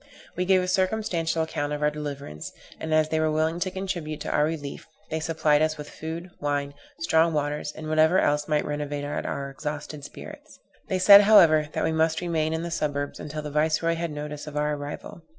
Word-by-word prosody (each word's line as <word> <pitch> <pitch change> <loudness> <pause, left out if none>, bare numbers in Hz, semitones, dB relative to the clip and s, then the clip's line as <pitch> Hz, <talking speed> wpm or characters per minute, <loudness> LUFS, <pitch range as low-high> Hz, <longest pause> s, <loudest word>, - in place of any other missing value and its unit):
We 180 - -1
gave 185 0 +4
a - - -3
circumstantial 185 -4 0
account 145 -2 -3
of 150 0 -3
our 150 - +3
deliverance; 140 - -6 0.3
and, 160 - -5
as 155 0 +3
they 160 - 0
were 155 0 +2
willing 160 +2 0
to 185 - 0
contribute 180 -5 -4
to - - -3
our 150 - +3
relief, 150 -3 -5 0.2
they 160 - -1
supplied 155 -2 +2
us 155 0 +1
with 150 0 -8
food, 165 +3 -6
wine, 145 -1 -1 0.3
strong 165 0 +3
waters, 150 0 -2
and 155 +1 -8
whatever 155 +3 +4
else 150 -3 +2
might 150 -1 +1
renovate 145 -1 -3
our 140 -1 -3
exhausted 150 0 -6
spirits. - - -11 0.3
They 190 - 0
said, 200 +2 +9
however, 170 -8 +6
that - - -1
we - - +1
must 160 0 +1
remain 160 -3 -1
in 160 +1 -2
the 170 - -4
suburbs 145 -3 -2
until 150 +1 -6
the 150 - -5
viceroy 155 +2 +1
had 165 0 -3
notice 150 0 -6
of 150 0 -6
our 150 0 +1
arrival. 145 +3 -7
155 Hz, 205 wpm, -26 LUFS, 150-165 Hz, 0.3 s, said